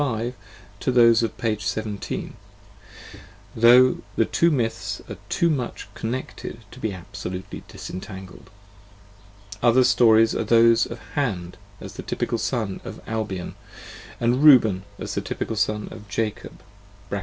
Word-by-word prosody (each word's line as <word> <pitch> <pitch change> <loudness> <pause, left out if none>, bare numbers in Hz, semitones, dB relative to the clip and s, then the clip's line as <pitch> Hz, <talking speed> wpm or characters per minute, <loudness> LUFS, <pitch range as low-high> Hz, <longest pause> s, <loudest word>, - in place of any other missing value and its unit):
5 120 -3 -1 0.5
to - - 0
those 115 -2 +6
of 115 - -2
p. 110 -2 0
17, 105 -1 -4 1.2
though 125 +3 +6 0.2
the 115 - +3
two 170 - +2
myths 110 - -1
are - - -7
too 170 - +2
much 135 -7 -2
con 110 - -4
necled 130 -2 -5
to 125 - -12
be 110 -4 -2
absolutely 90 +1 -7
disentangled. 95 +1 -9 1.1
Other 125 +2 +5
stories 115 -2 +5
are - - -1
those 115 +1 +5
of 115 - -7 0.2
Hand 95 -11 -2 0.2
as - - -9
the - - -7
typical 115 - -2
Son 110 -7 -2
of - - -8
Albion, 105 -5 -4 0.7
aud 120 +1 +2
Reuben 115 -10 +6
as - - -5
the - - -1
typical 110 - -4
Son 105 0 0
of 105 - -11
Jacob 110 0 -4 0.5
(pp. 100 - -1
115 Hz, 140 wpm, -24 LUFS, 100-120 Hz, 1.2 s, those